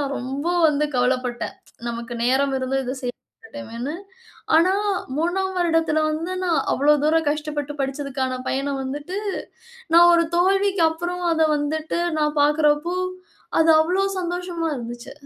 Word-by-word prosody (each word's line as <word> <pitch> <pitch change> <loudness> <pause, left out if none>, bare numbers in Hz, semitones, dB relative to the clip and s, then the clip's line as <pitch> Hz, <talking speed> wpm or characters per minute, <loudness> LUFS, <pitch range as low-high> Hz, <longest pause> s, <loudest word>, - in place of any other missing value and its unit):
நான் 280 -1 -2
ரொம்ப 270 +5 -4 0.2
வந்து 300 0 +1
கவலப்பட்டேன். 250 -1 -1 0.3
நமக்கு 235 0 -5
நேரம் 270 +2 +2
இருந்து 260 +1 -1
இத 255 +1 -3
செய்ய 245 -1 -2 0.3
மாட்டேமேன்னு. 285 - -6 0.6
ஆனா, 340 +4 +5 0.4
3ஆம் 370 +4 0
வருடத்தில 325 -3 +2
வந்து 325 +4 -3
நான் 335 -5 +2
அவ்வளோ 295 +2 +4
தூரம் 320 +1 +2
கஷ்டப்பட்டு 295 -1 -3
படிச்சிததுக்கான 265 -2 -2
பயன 275 +1 -1
வந்துட்டு, 290 +8 -4 0.7
நான் 345 +1 +8
ஒரு 335 0 +4
தோல்விக்கு 390 +1 +2
அப்புறம் 350 +2 -4
அத 320 -1 +2
வந்துட்டு 310 +3 -2 0.2
நான் 300 0 0
பார்க்குறப்போ, 300 +3 +2 0.7
அது 325 0 +5
அவ்வளோ 365 +5 +1
சந்தோஷமா 350 -1 -3
இருந்துச்சி. 240 0 -7
300 Hz, 130 wpm, -22 LUFS, 270-340 Hz, 0.7 s, நான்